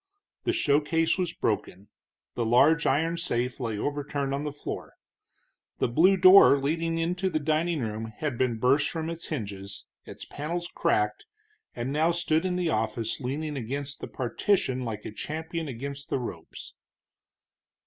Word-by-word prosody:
The 360 - +3
showcase 160 - +2
was 180 -2 0
broken, 105 - -3 0.4
the 120 - -1
large 145 +8 +4
iron 165 +5 +1
safe 125 -7 -2
lay 115 -4 -2
overturned 140 +2 -2
on 140 +1 -2
the 150 - -2
floor. 145 - -7 0.8
The - - +1
blue 175 +11 +4
door 185 -5 +8
leading 165 +4 -1
into 175 +3 0
the 155 - 0
dining 155 +1 0
room 110 -1 -3
had 150 -5 -2
been 120 -1 0
burst 135 +6 +3
from 165 0 -3
its 170 0 -7
hinges, 100 -7 -6 0.2
its - - -9
panels 170 +4 -4
cracked, 105 0 0 0.5
and 120 +2 -3
now 160 +3 +2
stood 165 0 +1
in 180 -1 0
the 180 -2 0
office 110 +1 -1
leaning 145 +4 -3
against 140 +3 -4
the - - -5
partition 130 - 0
like 110 -3 -5
a - - -5
champion 160 +7 -5
against 140 +2 -6
the - - 0
ropes. 90 -10 -7
145 Hz, 155 wpm, -27 LUFS, 120-165 Hz, 0.8 s, door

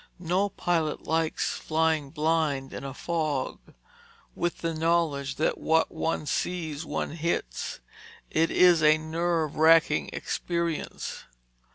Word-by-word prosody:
No 185 +3 0
pilot 170 -5 -1
likes 160 0 0
flying 160 -2 +1
blind 150 -3 0
in - - -6
a 135 - -5
fog. 155 -2 -2 0.7
With 175 0 -2
the 165 -1 -1
knowledge 155 -4 0
that 155 - 0
what 160 0 +2
one 165 -1 -2
sees, 160 0 -2
one 160 - -3
hits, 155 - -3 0.5
it 165 +1 +2
is 175 -3 +5
a 155 0 +6
nerve 160 0 -1
wracking 160 - +5
experience. 170 -2 -3
160 Hz, 120 wpm, -27 LUFS, 150-170 Hz, 0.7 s, a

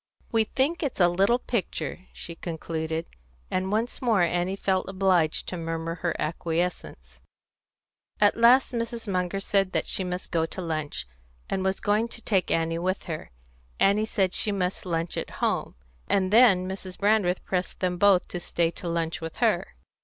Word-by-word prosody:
"We 225 -2 +3
think 275 +9 0
it's 285 -9 -2
a 175 - +6
little 195 +7 +3
picture," 200 -6 -3
she 170 - -8
concluded, 160 -1 -4 0.5
and 185 +1 -1
once 225 +3 -1
more 225 -7 +3
Annie 175 +2 0
felt 190 -1 0
obliged 185 -5 +2
to 180 - -4
murmur 165 0 -3
her 170 - 0
acquiescence. 160 - -3 1.0
At 205 -1 +5
last 240 +4 +5
Mrs. 230 -1 -3
Munger 185 0 -1
said 195 -1 +1
that - - +1
she 190 - -1
must 180 0 -5
go 165 -1 +1
to 190 - -7
lunch, 155 - -3 0.5
and 190 - 0
was 190 0 0
going 210 +3 +1
to 230 - -7
take 190 -5 +1
Annie 165 0 +1
with 185 +2 -1
her; 155 -3 -6 0.5
Annie 205 +2 +4
said 195 -4 0
she 210 - +1
must 185 -1 -2
lunch 165 -1 -2
at - - -3
home; - - -1 0.3
and 190 0 +1
then 205 -6 +6
Mrs. 190 -1 -6
Brandreth 205 -3 +2
pressed 180 -1 -2
them 180 -1 -1
both 200 -2 +5
to 175 - -4
stay 170 -1 0
to 170 +1 -6
lunch 165 -1 -2
with 165 0 -6
her. - - +1
185 Hz, 170 wpm, -26 LUFS, 170-205 Hz, 1.0 s, a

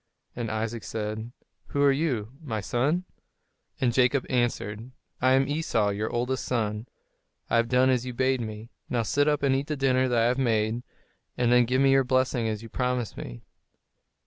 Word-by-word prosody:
And 120 -2 -3
Isaac 110 +1 -3
said, 110 +1 -4 0.4
"Who 140 - 0
are 140 - +6
you, 135 -7 -1
my 115 -9 -3
son?" 145 - 0 0.7
And 120 -2 +1
Jacob 130 +2 +3
answered, 120 -2 -1 0.3
"I 130 +1 +4
am 135 0 +3
Esau, 140 -9 0
your 105 +2 -2
oldest 125 +2 -1
son; 110 -2 -2 0.6
I - - +4
have 115 0 +2
done 130 +1 +4
as 125 -2 +1
you 130 - -4
bade 130 +1 +1
me; 110 +1 -7 0.2
now 120 -2 0
sit 145 +6 +1
up 150 -1 +1
and 135 -1 +3
eat 135 +2 -1
the 150 - -2
dinner 130 -1 +2
that 120 -1 +1
I 115 - +4
have 125 +2 +1
made, 115 -2 +1 0.6
and 120 -1 +2
then 125 0 +5
give 130 +3 +1
me 135 0 +5
your 135 0 +5
blessing 130 -2 +1
as 110 0 -3
you - - -8
promised 125 -1 -2
me." - - -8
125 Hz, 190 wpm, -27 LUFS, 115-130 Hz, 0.7 s, are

